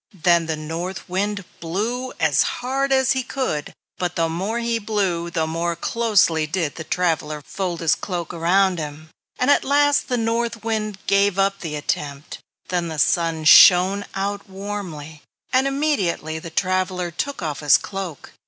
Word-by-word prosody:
Then 170 -2 +4
the 160 - -1
North 165 +5 -5
Wind 200 +2 -2
blew 225 +10 -3
as 150 -4 +3
hard 270 +2 -1
as 265 -2 +3
he 260 - +1
could, 255 - -3 0.3
but 180 -1 -2
the 165 -1 +1
more 190 +8 -2
he 235 -1 -1
blew 195 -6 -1
the 160 -2 -1
more 170 +2 -2
closely 180 -6 +2
did 160 -2 -2
the 160 - -7
traveler 155 -3 -1
fold 185 -3 -4
his 165 - +3
cloak 175 -4 -4
around 180 +2 +2
him; 155 +1 -7 0.3
and 255 +3 +3
at - - +4
last 290 +1 +3
the 250 - 0
North 230 0 -1
Wind 215 -3 -2
gave 200 -1 +2
up 195 0 +1
the 155 -3 -5
attempt. 145 0 -4 0.3
Then 175 -2 -1
the 160 -1 -5
Sun 165 +1 +1
shined 190 +5 +7
out 200 +1 -3
warmly, 185 -7 -7 0.3
and 260 +1 +3
immediately 210 - -1
the 165 - -8
traveler 185 0 -1
took 275 +5 -4
off 150 -2 -3
his 150 -2 +5
cloak. 190 -7 -7
185 Hz, 160 wpm, -22 LUFS, 165-215 Hz, 0.3 s, shined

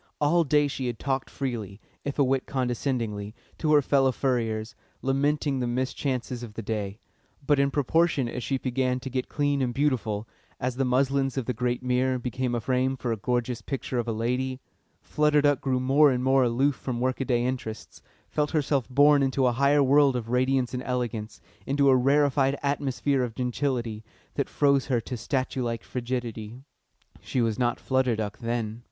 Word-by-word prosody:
All 165 +4 +3
day 145 -1 +3
she 135 -2 -3
had 120 -2 -3
talked 135 +1 -2
freely, 110 -7 -4 0.2
if 140 - -4
a 145 - +4
whit 135 0 0
condescendingly, 120 -5 -2 0.2
to 155 - +1
her 145 -1 +5
fellow 135 -1 +3
furriers, 115 -4 -1 0.3
lamenting 140 +1 +1
the 125 - -1
mischances 130 0 -2
of 115 -3 -9
the 115 - -5
day; 105 -2 -3 0.5
but 145 -1 +3
in 140 0 +3
proportion 145 -1 +2
as 125 - -4
she 135 +2 -1
began 130 0 -1
to 135 0 -6
get 130 0 -2
clean 145 -1 0
and 120 -2 -1
beautiful, 115 -7 0 0.3
as 125 0 -2
the 135 - +1
muslins 135 +1 +1
of 130 - -1
the 125 - -1
great 125 +1 -1
mirror 125 +1 +1
became 125 0 -2
a - - 0
frame 130 +2 0
for 125 -2 -2
a - - +1
gorgeous 120 +2 -2
picture 135 -2 -3
of 120 - -2
a - - 0
lady, 125 +4 -1 0.4
Flutter 150 0 +2
Duck 145 -2 +2
grew 130 -2 0
more 140 +4 +5
and 125 -1 0
more 135 +1 +4
aloof 130 +4 +2
from 125 -3 -4
workaday 125 -1 0
interests, 120 -4 -5 0.3
felt 150 -1 -1
herself 140 -4 0
borne 145 +2 +5
into 135 0 +1
a 125 - +4
higher 140 +3 +3
world 140 0 +4
of 115 -2 -3
radiance 130 0 +1
and 125 - -2
elegance, 120 -4 -3 0.3
into 140 0 +3
a 130 - +6
rarefied 140 +1 +3
atmosphere 140 -1 0
of 120 -3 -3
gentility, 125 -3 -2 0.3
that 140 - -2
froze 140 -2 +2
her 125 -3 +2
to 125 - -5
statue 130 +2 -2
like 115 -2 -2
frigidity. 120 -2 -4 0.6
She 130 - -2
was 115 -3 0
not 120 -1 +1
Flutter 130 -3 +1
Duck 105 -1 -4
then. 115 -2 -3
130 Hz, 185 wpm, -26 LUFS, 120-140 Hz, 0.6 s, a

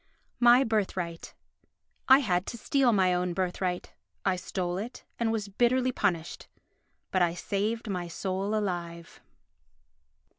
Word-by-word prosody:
My 240 +2 +7
Birthright 185 -7 -2 0.7
I 265 +2 +8
had 180 -2 0
to 235 - -5
steal 260 +2 +2
my 190 -4 +3
own 180 -1 -1
birthright. 180 0 -2 0.3
I 190 - +3
stole 180 -1 -3
it 235 +5 -7
and 230 -1 +1
was 215 -2 -2
bitterly 245 +5 +2
punished. 175 -9 -2 0.6
But 185 - +2
I 170 -1 +2
saved 215 +6 -2
my 180 -3 -3
soul 190 +4 -2
alive. 170 -5 -4
195 Hz, 125 wpm, -28 LUFS, 180-225 Hz, 0.7 s, I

